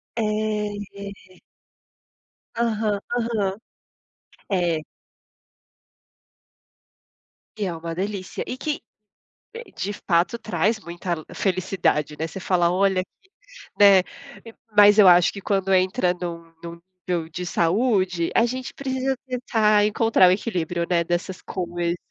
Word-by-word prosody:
É, 230 Hz, -, -1 dB, 0.7 s
É. 200 Hz, -2 st, -11 dB, 1.2 s
Aham. 215 Hz, -3 st, 0 dB, 0.2 s
Aham. 215 Hz, -5 st, -1 dB, 0.9 s
É. 175 Hz, -5 st, 0 dB, 2.7 s
E 210 Hz, -, -1 dB
é 180 Hz, -, -2 dB
uma 165 Hz, 0 st, -6 dB
delícia, 195 Hz, +1 st, -4 dB
e 250 Hz, -, -4 dB
que, 300 Hz, +2 st, -3 dB, 0.9 s
de 200 Hz, +2 st, -3 dB
fato, 175 Hz, +2 st, 0 dB
traz 215 Hz, +1 st, 0 dB
muita 170 Hz, -3 st, -5 dB
felicidade, 185 Hz, -6 st, 0 dB
né. 160 Hz, -, -2 dB
Você 165 Hz, -, -8 dB
fala: 175 Hz, -2 st, +2 dB
“Olha 190 Hz, 0 st, +2 dB
aqui!”, 380 Hz, -, -17 dB, 0.5 s
né. 200 Hz, -2 st, +7 dB, 0.7 s
Mas, 205 Hz, +1 st, +8 dB
eu 200 Hz, -, +8 dB
acho 175 Hz, -1 st, +6 dB
que, 200 Hz, -, -9 dB
quando 195 Hz, -1 st, 0 dB
entra 185 Hz, 0 st, +2 dB
num 170 Hz, -2 st, -7 dB
num 170 Hz, 0 st, -8 dB, 0.3 s
nível 170 Hz, -3 st, -1 dB
de 180 Hz, +2 st, -5 dB
saúde, 185 Hz, -1 st, +1 dB
a 230 Hz, -, +5 dB
gente 255 Hz, +1 st, -5 dB
precisa 265 Hz, -1 st, -2 dB
tentar 220 Hz, -4 st, +2 dB
encontrar 210 Hz, -3 st, +4 dB
o -, -, +4 dB
equilíbrio, 175 Hz, -4 st, -1 dB
né, 170 Hz, -2 st, +2 dB
dessas 175 Hz, +2 st, -3 dB
coisas. 175 Hz, -1 st, -3 dB
190 Hz, 115 wpm, -23 LUFS, 175-210 Hz, 2.7 s, Mas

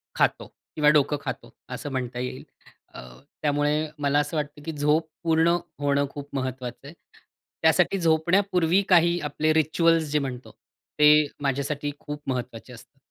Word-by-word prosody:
खातो -, -, +1 dB, 0.3 s
किंवा 150 Hz, -1 st, +4 dB
डोकं 150 Hz, 0 st, +3 dB
खातो -, -, -6 dB, 0.2 s
असं 145 Hz, -, -6 dB
म्हणता 125 Hz, -2 st, -4 dB
येईल. 125 Hz, +1 st, -5 dB, 0.5 s
अ, -, -, -9 dB, 0.4 s
त्यामुळे 150 Hz, +1 st, +1 dB
मला 145 Hz, 0 st, +2 dB
असं 150 Hz, +2 st, -2 dB
वाटतं, 150 Hz, 0 st, -4 dB
की 160 Hz, -, -3 dB
झोप 150 Hz, +2 st, +1 dB, 0.2 s
पूर्ण 165 Hz, +1 st, +3 dB, 0.2 s
होणं 140 Hz, 0 st, +1 dB
खूप 145 Hz, 0 st, -9 dB
महत्वाचं 130 Hz, 0 st, -5 dB
आहे. 150 Hz, -, -10 dB, 0.7 s
त्यासाठी 195 Hz, -, +3 dB
झोपण्यापूर्वी 175 Hz, +2 st, +2 dB
काही 175 Hz, -1 st, +4 dB
आपले 155 Hz, +2 st, +1 dB
रिच्युअल्स 160 Hz, +1 st, +3 dB
जे 150 Hz, -, +2 dB
म्हणतो, 130 Hz, -3 st, -6 dB, 0.5 s
ते 150 Hz, 0 st, +6 dB
माझ्यासाठी 140 Hz, +1 st, -2 dB
खूप 145 Hz, 0 st, -7 dB
महत्वाचे 125 Hz, -2 st, -5 dB
असतात. 125 Hz, +3 st, -16 dB
150 Hz, 140 wpm, -25 LUFS, 140-160 Hz, 0.7 s, ते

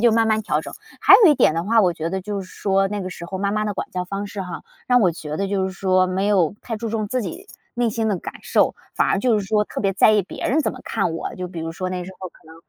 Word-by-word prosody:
就 235 Hz, -1 st, +5 dB
慢 225 Hz, 0 st, +3 dB
慢 220 Hz, 0 st, +1 dB
调 150 Hz, -6 st, 0 dB
整， -, -, -8 dB, 0.3 s
还 -, -, +8 dB
有 325 Hz, -, +8 dB
一 -, -, +1 dB
点 160 Hz, -, +3 dB
的 165 Hz, -, -1 dB
话， 225 Hz, +3 st, +4 dB
我 180 Hz, -4 st, +2 dB
觉 160 Hz, +1 st, -3 dB
得 190 Hz, +1 st, -2 dB
就 200 Hz, 0 st, -4 dB
是 -, -, -11 dB
说 195 Hz, -1 st, +1 dB
那 205 Hz, +1 st, -3 dB
个 185 Hz, -, -4 dB
时 170 Hz, -1 st, -8 dB
候 190 Hz, +2 st, -5 dB
妈 200 Hz, +1 st, 0 dB
妈 215 Hz, 0 st, 0 dB
的 210 Hz, -, -1 dB
管 195 Hz, -, -5 dB
教 180 Hz, 0 st, -3 dB
方 200 Hz, +2 st, -4 dB
式 200 Hz, -1 st, -5 dB
哈， 180 Hz, -, -6 dB, 0.3 s
让 250 Hz, 0 st, +4 dB
我 185 Hz, -5 st, +4 dB
觉 155 Hz, -2 st, -6 dB
得 195 Hz, 0 st, -1 dB
就 190 Hz, -1 st, 0 dB
是 190 Hz, -, -5 dB
说 185 Hz, -1 st, +2 dB
没 190 Hz, +2 st, -1 dB
有 190 Hz, -3 st, +2 dB
太 225 Hz, -3 st, -4 dB
注 225 Hz, +1 st, -4 dB
重 215 Hz, -1 st, -2 dB
自 255 Hz, +4 st, -1 dB
己 365 Hz, -, -7 dB, 0.3 s
内 240 Hz, -2 st, +1 dB
心 225 Hz, 0 st, -1 dB
的 200 Hz, -, +1 dB
感 -, -, -7 dB
受， -, -, +2 dB, 0.2 s
反 -, -, +2 dB
而 -, -, +2 dB
就 230 Hz, 0 st, +2 dB
是 205 Hz, -, -3 dB
说 210 Hz, +1 st, +2 dB
特 -, -, -6 dB
别 195 Hz, -1 st, +1 dB
在 205 Hz, +3 st, +5 dB
意 210 Hz, -1 st, +3 dB
别 185 Hz, -, -6 dB
人 300 Hz, +5 st, +2 dB
怎 -, -, 0 dB
么 -, -, -10 dB
看 195 Hz, -6 st, -1 dB
我。 -, -, -5 dB
就 180 Hz, 0 st, -5 dB
比 175 Hz, -, -8 dB
如 165 Hz, 0 st, -4 dB
说 185 Hz, +2 st, -4 dB
那 180 Hz, -1 st, -4 dB
时 190 Hz, -, -9 dB
候 185 Hz, -, -6 dB
可 -, -, -24 dB
能， 160 Hz, -, -13 dB
195 Hz, 340 characters per minute, -22 LUFS, 185-215 Hz, 0.3 s, 还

